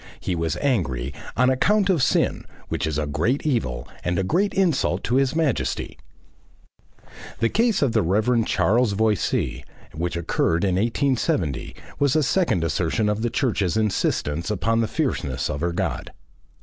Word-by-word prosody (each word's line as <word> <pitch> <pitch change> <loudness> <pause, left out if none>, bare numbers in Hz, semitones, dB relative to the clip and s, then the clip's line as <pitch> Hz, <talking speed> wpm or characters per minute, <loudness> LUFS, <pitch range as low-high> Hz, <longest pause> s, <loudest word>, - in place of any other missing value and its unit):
He 90 - -2
was 85 -1 -1
angry 70 - 0 0.2
"on 125 +2 +4
account 200 +10 +2
of 180 -7 +2
Sin, - - +1 0.2
which - - -1
is 75 -2 -2
a 75 - 0
great 85 - -1
evil 65 - -1 0.2
and 90 0 -1
a 95 - +1
great 185 - +1
insult 160 - +1
to 125 - +1
His 135 +1 +1
Majesty." 155 -7 -1 1.4
The 115 - +1
case 225 - +2
of 135 - +2
the 110 -1 +2
Rev. 110 +7 +2
Charles 115 +1 +2
Voysey, 110 -1 0 0.3
which 85 +2 -3
occurred 85 +1 0
in 95 -2 +2
1870, 110 - 0 0.2
was 140 -1 +2
a 155 - +3
second 150 - +1
assertion 90 +5 0
of 105 +1 -1
the 120 - 0
Church's 110 - 0
insistence 90 -6 0
upon 115 +3 +1
the 115 - 0
fierceness 75 - -2
of 70 - -4
her 85 +1 0
God. 85 - -3
110 Hz, 160 wpm, -23 LUFS, 85-130 Hz, 1.4 s, on